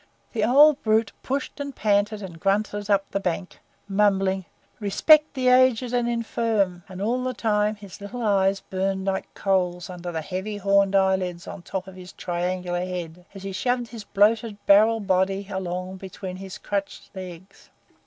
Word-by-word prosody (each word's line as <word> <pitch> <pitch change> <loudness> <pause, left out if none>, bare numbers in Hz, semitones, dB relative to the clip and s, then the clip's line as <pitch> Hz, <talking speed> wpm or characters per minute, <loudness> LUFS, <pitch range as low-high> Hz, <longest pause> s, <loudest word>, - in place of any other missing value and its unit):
The 220 -3 0
old 285 +5 +6
brute 220 -1 +2
pushed 275 +2 -3
and 280 -2 -5
panted 210 0 +1
and 170 -4 -9
grunted 205 +2 0
up 200 -1 +3
the 195 - 0
bank, 180 -1 -3 0.3
mumbling, 195 -2 +2 0.3
"Respect 300 +10 +4
the 255 -1 0
aged 250 -1 +4
and 240 -1 +1
infirm!" 225 -5 0
and 185 0 -8
all 245 +4 0
the 255 0 -2
time 210 -1 +1
his 200 -2 -12
little 235 +4 -6
eyes 195 -2 +2
burned 190 0 -2
like 195 -1 -2
coals 180 -2 0
under 175 -1 -6
the 160 -1 -3
heavy, 190 +5 -4
horny 200 0 +3
eyelids 190 -2 0
on - - -7
the 175 - -18
top 190 -1 -3
of 190 - -10
his 185 0 -11
triangular 180 0 -2
head, 180 -1 -6
as 195 - -9
he 195 - -4
shoved 245 +4 -1
his 230 -3 -8
bloated 215 +1 +2
barrel 220 +3 +5
body 195 0 0
along 185 0 -4
between 185 -1 -7
his 190 0 -8
crutched 200 -1 -5
legs. 185 0 -10
195 Hz, 170 wpm, -24 LUFS, 185-220 Hz, 0.3 s, old